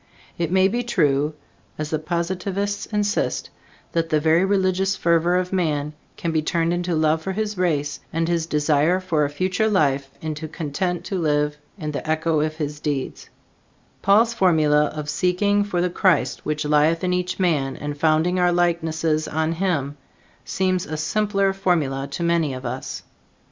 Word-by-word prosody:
It 170 -1 -2
may 190 0 +4
be 240 +5 -1
true, 150 - +1 0.4
as 155 0 -4
the 155 - 0
Positivists 185 +5 -2
insist, 210 0 -1 0.4
that 165 -1 0
the 155 -2 +2
very 160 +3 +3
religious 190 0 +1
fervor 170 +1 +2
of 180 +1 -2
man 150 -5 0 0.2
can 170 - -2
be 160 -1 +1
turned 165 +2 0
into 175 -1 -1
love 155 0 +2
for 190 +4 -3
his 210 +1 -2
race, 150 -6 0
and 165 0 0
his 165 -1 0
desire 150 +3 +2
for 165 -5 +1
a - - -2
future 185 +8 0
life 140 -8 +1
into 155 0 -5
content 170 +3 -3
to 190 - -2
live 150 -2 +1 0.2
in 155 -5 -4
the 150 +2 -5
echo 160 0 +1
of 155 +1 -1
his 150 -2 -4
deeds; 145 -3 -4 0.7
Paul's 225 +4 +4
formula 155 -7 +3
of 150 0 -5
seeking 200 +6 +1
for 185 -4 -1
the 180 - +1
Christ 185 0 +1
which 150 0 -1
lieth 150 +3 +3
in 180 0 +1
each 180 +1 -2
man 150 -7 +1
and 145 0 -4
founding 160 +4 +2
our 180 0 +3
likenesses 165 -3 0
on 160 +1 -1
him, 165 -5 -1 0.5
seems 185 +5 -1
a 155 - -4
simpler 195 +4 +1
formula 155 -8 0
to 170 - -4
many 170 -5 +1
of 130 - -8
us. - - -5
165 Hz, 170 wpm, -22 LUFS, 150-185 Hz, 0.7 s, may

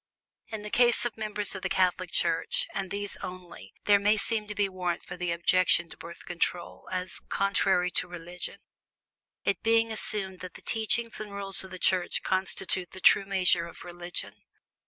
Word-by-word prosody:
In 215 -2 -6
the 210 - -7
case 240 -1 +4
of 240 - -2
members 210 -1 -2
of 190 - -6
the - - -2
Catholic 185 -1 +1
Church 165 -1 0
and 195 -1 -3
these 205 +1 -4
only 180 - -9
there 205 -1 +6
may 210 +2 +3
seem 215 0 +1
to 210 - -5
be 205 -1 +2
warrant 180 -2 -3
for 175 - -7
the 180 -1 -2
objection 170 0 +3
to - - -8
Birth 170 +1 -10
Control 175 0 -3
as 185 0 -3
"contrary 195 -2 +2
to 180 +2 -1
religion," 175 0 -7 0.9
it 195 -3 0
being 225 0 +3
assumed 195 -4 +1
that 185 -1 -8
the - - -11
teachings 225 +1 0
and 210 -1 -7
rules 195 -1 -1
of 190 - -10
the 185 - -7
Church 180 -1 +2
constitute 185 -1 -1
the 185 - -7
true 195 - +6
measure 185 -3 +2
of - - -11
"religion." 175 -1 -5
185 Hz, 180 wpm, -29 LUFS, 180-205 Hz, 0.9 s, there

